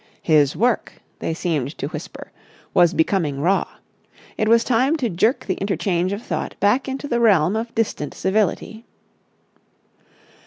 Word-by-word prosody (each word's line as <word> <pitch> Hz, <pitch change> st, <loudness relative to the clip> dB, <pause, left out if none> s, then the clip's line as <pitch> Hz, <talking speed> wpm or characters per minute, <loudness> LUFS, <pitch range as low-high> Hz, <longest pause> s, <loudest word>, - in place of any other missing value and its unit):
His 150 Hz, -3 st, +3 dB
work, 240 Hz, 0 st, 0 dB, 0.3 s
they -, -, -2 dB
seemed 155 Hz, -5 st, -2 dB
to -, -, -3 dB
whisper, 155 Hz, 0 st, -9 dB, 0.4 s
was 175 Hz, -1 st, +5 dB
becoming 160 Hz, -4 st, 0 dB
raw. 185 Hz, +7 st, +1 dB, 0.7 s
It 215 Hz, -, -1 dB
was 230 Hz, +1 st, +5 dB
time 255 Hz, +6 st, +2 dB
to 250 Hz, -9 st, -2 dB
jerk 220 Hz, -, +1 dB
the 190 Hz, -, 0 dB
interchange 190 Hz, -2 st, -1 dB
of 200 Hz, +3 st, -4 dB
thought -, -, -4 dB
back 210 Hz, +7 st, +2 dB
into 270 Hz, +2 st, -4 dB
the 240 Hz, -3 st, 0 dB
realm 200 Hz, -5 st, +3 dB
of 230 Hz, +1 st, -4 dB
distant 215 Hz, -10 st, -2 dB
civility. 215 Hz, +3 st, -1 dB
200 Hz, 145 wpm, -21 LUFS, 170-230 Hz, 0.7 s, was